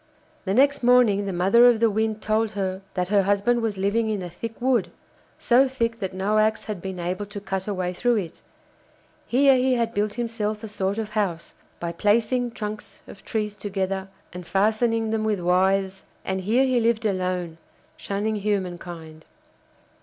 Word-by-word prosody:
The 190 Hz, +1 st, 0 dB
next 280 Hz, +2 st, +4 dB
morning 240 Hz, -5 st, +4 dB
the -, -, -1 dB
mother 195 Hz, +7 st, +5 dB
of 240 Hz, -2 st, +4 dB
the 230 Hz, -, +4 dB
Wind 220 Hz, 0 st, -1 dB
told 220 Hz, 0 st, 0 dB
her 190 Hz, -2 st, -3 dB
that 180 Hz, -1 st, -1 dB
her 205 Hz, -1 st, +4 dB
husband 205 Hz, +5 st, +1 dB
was 220 Hz, -3 st, -2 dB
living 210 Hz, +4 st, 0 dB
in 205 Hz, -3 st, -2 dB
a 175 Hz, -, -7 dB
thick 225 Hz, +6 st, -7 dB
wood, 250 Hz, -4 st, +1 dB, 0.5 s
so 255 Hz, +3 st, +4 dB
thick 230 Hz, -3 st, -2 dB
that 190 Hz, -4 st, -3 dB
no 195 Hz, +3 st, 0 dB
axe 220 Hz, 0 st, +1 dB
had 210 Hz, -5 st, -6 dB
been 190 Hz, -1 st, -6 dB
able 185 Hz, +4 st, -3 dB
to 205 Hz, 0 st, -7 dB
cut 190 Hz, -1 st, -4 dB
a 205 Hz, -, -1 dB
way 180 Hz, -1 st, -2 dB
through 240 Hz, +6 st, +1 dB
it; 180 Hz, -6 st, -4 dB, 0.9 s
here 270 Hz, +2 st, +5 dB
he 255 Hz, 0 st, +2 dB
had 230 Hz, -1 st, -1 dB
built 205 Hz, 0 st, -1 dB
himself 225 Hz, -2 st, -3 dB
a -, -, -4 dB
sort 200 Hz, -1 st, -2 dB
of 215 Hz, -1 st, -4 dB
house 195 Hz, -6 st, -2 dB, 0.3 s
by 170 Hz, -1 st, -3 dB
placing 230 Hz, +7 st, +1 dB
trunks 215 Hz, -2 st, -7 dB
of 195 Hz, -, -13 dB
trees 210 Hz, -2 st, -2 dB
together 195 Hz, -2 st, -3 dB, 0.3 s
and 180 Hz, -1 st, -8 dB
fastening 220 Hz, +2 st, +1 dB
them 220 Hz, -1 st, 0 dB
with 215 Hz, -3 st, 0 dB
withes 190 Hz, +2 st, +1 dB, 0.2 s
and 190 Hz, 0 st, -2 dB
here 225 Hz, +8 st, +2 dB
he 255 Hz, -2 st, +2 dB
lived 230 Hz, -1 st, +1 dB
alone, 180 Hz, -4 st, -2 dB, 0.4 s
shunning 210 Hz, +2 st, -2 dB
human 195 Hz, -4 st, -1 dB
kind. 160 Hz, -3 st, -10 dB
210 Hz, 185 wpm, -24 LUFS, 190-230 Hz, 0.9 s, mother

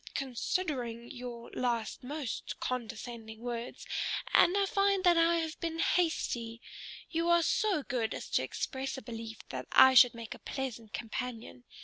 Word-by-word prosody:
considering 250 Hz, -3 st, -2 dB
your 240 Hz, -1 st, -7 dB
last 235 Hz, -3 st, -1 dB
most 280 Hz, -1 st, -4 dB
condescending 230 Hz, -2 st, -5 dB
words, 240 Hz, 0 st, -5 dB, 0.5 s
and 365 Hz, +4 st, +6 dB
I 400 Hz, -, +3 dB
find 395 Hz, -1 st, +2 dB
that 350 Hz, -2 st, +6 dB
I 335 Hz, 0 st, +4 dB
have 325 Hz, -1 st, -2 dB
been 330 Hz, -1 st, -3 dB
hasty. 240 Hz, -10 st, 0 dB, 0.5 s
You 335 Hz, +1 st, +1 dB
are 340 Hz, -1 st, +5 dB
so 385 Hz, -3 st, +2 dB
good 235 Hz, -4 st, -1 dB
as -, -, -6 dB
to -, -, +3 dB
express 265 Hz, -1 st, -3 dB
a 265 Hz, -, -8 dB
belief 225 Hz, -1 st, -8 dB
that 130 Hz, -1 st, -5 dB
I 265 Hz, 0 st, +8 dB
should 250 Hz, -2 st, +8 dB
make 230 Hz, -1 st, -7 dB
a -, -, -13 dB
pleasant 235 Hz, -5 st, -5 dB
companion. 245 Hz, +1 st, -5 dB
250 Hz, 150 wpm, -32 LUFS, 230-330 Hz, 0.5 s, I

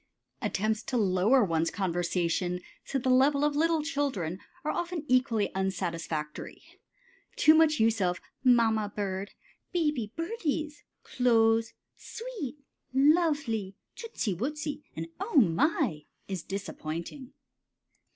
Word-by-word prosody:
Attempts 215 Hz, +2 st, 0 dB
to 250 Hz, -, -2 dB
lower 205 Hz, +5 st, +4 dB
one's 165 Hz, -2 st, +1 dB
conversation 175 Hz, -1 st, -1 dB, 0.3 s
to 275 Hz, -, -1 dB
the 260 Hz, 0 st, +1 dB
level 280 Hz, +3 st, +4 dB
of 295 Hz, -1 st, +1 dB
little 325 Hz, 0 st, +2 dB
children 265 Hz, -, -2 dB, 0.2 s
are 305 Hz, -, 0 dB
often 345 Hz, -3 st, -3 dB
equally 250 Hz, -5 st, +2 dB
unsatisfactory. 165 Hz, -5 st, -3 dB, 0.7 s
Too 310 Hz, -, +6 dB
much 315 Hz, -1 st, +4 dB
use 220 Hz, -1 st, +3 dB
of 180 Hz, -1 st, +1 dB, 0.2 s
"Mamma 225 Hz, -4 st, +3 dB
bird," 195 Hz, -1 st, -3 dB, 0.4 s
"baby 300 Hz, -, 0 dB
birdies," 315 Hz, -5 st, -3 dB, 0.2 s
"clothes," 225 Hz, -2 st, +2 dB, 0.2 s
"sweet," 450 Hz, -, -6 dB, 0.4 s
"lovely," 275 Hz, -, +2 dB, 0.2 s
"tootsy 450 Hz, -, -3 dB
wootsy," 295 Hz, -, -3 dB
and 165 Hz, +1 st, -4 dB
"Oh, 405 Hz, -2 st, -4 dB
my!" 230 Hz, -, +3 dB, 0.2 s
is 190 Hz, -3 st, -3 dB
disappointing. 195 Hz, -, -6 dB
230 Hz, 110 wpm, -29 LUFS, 190-295 Hz, 0.7 s, Too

